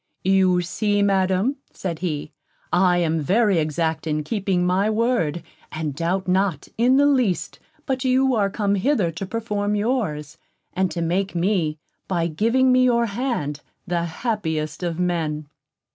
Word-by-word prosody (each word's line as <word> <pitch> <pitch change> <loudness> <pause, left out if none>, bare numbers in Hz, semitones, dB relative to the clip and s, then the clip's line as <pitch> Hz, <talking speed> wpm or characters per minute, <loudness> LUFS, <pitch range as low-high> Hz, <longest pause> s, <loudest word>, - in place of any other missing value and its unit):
"You 185 -1 +3
see, 205 +3 0
Madam," 195 +5 +1
said 170 -4 -5
he, 155 -4 -3 0.4
"I 180 0 +4
am 165 -2 +1
very 195 +3 +3
exact 160 +1 -1
in 150 -1 -1
keeping 190 -1 0
my 190 +4 +2
word, 215 -8 0 0.3
and 155 -2 -3
doubt 175 +6 -1
not, 185 -4 0
in 250 +3 +4
the 285 - +5
least, 255 -10 +1 0.3
but 265 -1 -1
you 260 0 +3
are 205 -4 +2
come 200 0 0
hither 205 - +1
to 190 +3 -6
perform 210 -1 -2
yours, 185 - -2 0.3
and 185 0 +1
to 170 -1 -3
make 185 +3 -1
me, 170 -4 0 0.3
by 175 -3 0
giving 230 +10 +2
me 255 0 +5
your 235 -1 +3
hand, 200 - -3 0.2
the 175 -2 -1
happiest 160 - -3
of 170 -1 -3
men." 160 -4 -1
185 Hz, 150 wpm, -22 LUFS, 165-220 Hz, 0.4 s, the